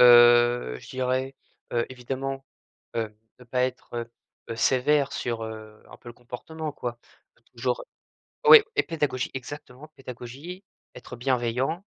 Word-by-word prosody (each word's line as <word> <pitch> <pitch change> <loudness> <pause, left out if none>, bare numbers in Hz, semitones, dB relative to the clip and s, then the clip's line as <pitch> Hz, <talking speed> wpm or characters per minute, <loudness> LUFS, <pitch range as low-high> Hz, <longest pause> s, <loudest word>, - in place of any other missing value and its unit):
heu, 120 - +7
je - - -14
dirais, 130 +1 -1 0.4
heu, 120 -1 +1
évidemment, 135 +2 -4 0.5
heu, 110 -2 -2 0.2
ne 125 - -14
pas 125 +1 0
être, 125 -1 -3
heu, 115 0 -4 0.4
heu, 115 - -3
sévère 135 +4 +3
sur, 115 -2 -2
heu, 110 -1 -9
un - - -11
peu - - -13
le - - -10
comportement 150 +6 -6
quoi. 120 -3 -5 0.6
Genre - - -1 0.7
oui 460 -1 +12
et 415 - +5
pédagogie 150 -6 -1
exactement, 135 +1 -8
pédagogie, 135 - -8 0.3
être 125 0 -9
bienveillant. 130 - 0
125 Hz, 135 wpm, -26 LUFS, 120-135 Hz, 0.7 s, oui